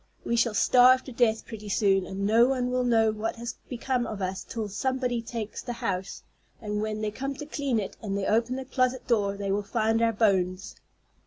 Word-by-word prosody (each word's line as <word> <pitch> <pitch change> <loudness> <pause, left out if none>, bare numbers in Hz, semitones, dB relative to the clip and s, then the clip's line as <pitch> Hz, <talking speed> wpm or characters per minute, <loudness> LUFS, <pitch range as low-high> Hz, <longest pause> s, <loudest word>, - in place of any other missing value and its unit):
We 235 - 0
shall 230 -2 +2
starve 255 +3 +6
to 265 - -9
death 230 -2 +1
pretty 215 -2 -8
soon, 195 -2 +2
and 195 +1 -3
no 230 +4 +5
one 250 -2 0
will 255 0 +1
know 225 -2 +3
what 215 +1 -3
has 235 +1 -5 0.2
become 250 0 -1
of 215 - -5
us 190 0 -3
till 225 -3 -4
somebody 250 +4 -1
takes 230 -2 -5
the 245 - -5
house; 190 -5 -4 0.4
and 210 -1 -3
when 215 0 -3
they 215 -1 -1
come 275 +5 -4
to 295 - -7
clean 280 -5 -1
it 200 - -5
and 200 -2 -3
they 195 - -2
open 230 +4 +1
the 265 0 -5
closet 255 -1 0
door, 200 -4 +1
they 200 -1 -2
will 200 +1 +1
find 225 +2 0
our 230 0 +3
bones." 190 -4 0
225 Hz, 215 wpm, -27 LUFS, 205-245 Hz, 0.4 s, starve